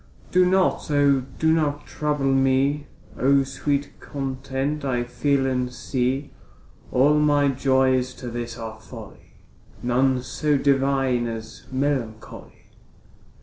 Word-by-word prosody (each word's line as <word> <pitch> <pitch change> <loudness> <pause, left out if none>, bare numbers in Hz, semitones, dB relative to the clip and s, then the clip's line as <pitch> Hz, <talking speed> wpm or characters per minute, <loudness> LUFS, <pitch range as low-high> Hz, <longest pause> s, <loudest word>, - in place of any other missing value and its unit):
Do 180 0 +4
not, 185 -2 +1
O 145 -2 +4 0.2
do 160 0 +3
not 145 -2 0
trouble 145 -3 -1
me, 135 +2 +2 0.3
So 140 +1 +4
sweet 140 +1 -2
content 135 +1 -3
I 125 -3 0
feel 135 +2 0
and 125 -1 -1
see. 130 +2 -2 0.6
All 145 +4 +4
my 145 -1 +3
joys 130 -1 +2
to 125 -2 -7
this 120 0 -5
are 110 -1 -7
folly, 110 - -13 0.5
None 125 +1 +2
so 150 +2 0
divine 135 -3 +1
as 115 -1 -8
melancholy. 130 -5 -4
135 Hz, 115 wpm, -23 LUFS, 125-145 Hz, 0.6 s, Do